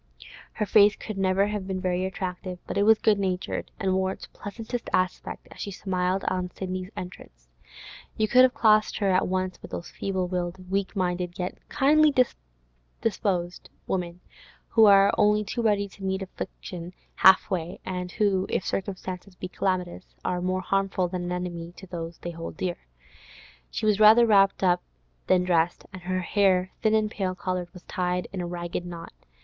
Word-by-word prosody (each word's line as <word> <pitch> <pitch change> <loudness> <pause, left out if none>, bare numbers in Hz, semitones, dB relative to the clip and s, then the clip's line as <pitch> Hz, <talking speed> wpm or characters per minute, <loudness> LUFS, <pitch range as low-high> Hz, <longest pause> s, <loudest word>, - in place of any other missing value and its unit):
Her 210 - -1
face 210 0 +6
could 215 -3 -6
never 190 +1 +3
have 205 -2 -3
been 190 -1 -2
very 185 0 0
attractive, 185 -1 -4
but - - -5
it 200 - +2
was 220 +2 +6
good 210 -2 +3
natured, 185 -2 -2
and 190 -3 +1
wore 190 0 +1
its - - -8
pleasantest 225 +3 -6
aspect 185 0 -1
as - - -13
she - - -4
smiled 185 -1 -1
on 180 -1 -1
Sidney's 185 0 -5
entrance. - - -9 0.7
You 215 - +2
would 250 - +8
have 255 -1 +5
classed 215 -1 +4
her 200 -2 +1
at 185 +1 +2
once 185 0 -2
with - - -10
those 170 - -6
feeble 190 -2 -2
willed, 180 0 -4
weak 195 +1 -1
minded, 180 -1 -1
yet 180 -1 -3
kindly 300 +2 +4 0.9
disposed 185 -5 -1 0.2
women, 175 -1 -3 0.5
who 225 -2 +6
are 195 0 +6
only 210 0 +4
too 235 +4 -3
ready 205 -3 +2
to 195 - -14
meet 190 0 -1
affliction 180 -1 -7 0.2
half 190 - +6
way, 175 0 -3
and 180 -1 -4
who, 195 -3 +1
if - - -1
circumstances 185 -1 -4
be 180 - -6
calamitous, 185 -1 -3
are 180 -1 -1
more 185 +1 0
harmful 195 -1 0
than 180 -1 -3
an 175 - -3
enemy 175 -1 -4
to 190 - -10
those 170 -2 -6
they 175 - -6
hold 165 0 -7
dear. 180 -2 -2 0.9
She - - -3
was 210 -1 +3
rather 220 +2 +8
wrapped 195 -3 +4
up 180 -1 +3 0.5
than 180 -1 +4
dressed, 175 -1 +1
and 185 - -8
her 185 +1 -2
hair, 185 -1 +2
thin 220 -1 +3
and 215 -1 +1
pale 185 -4 -2
coloured, 180 -1 -3
was 180 -1 -13
tied 180 -1 -2
in 190 - -3
a 175 - -3
ragged 175 0 -4
knot. 170 -1 -8
185 Hz, 180 wpm, -26 LUFS, 180-200 Hz, 0.9 s, would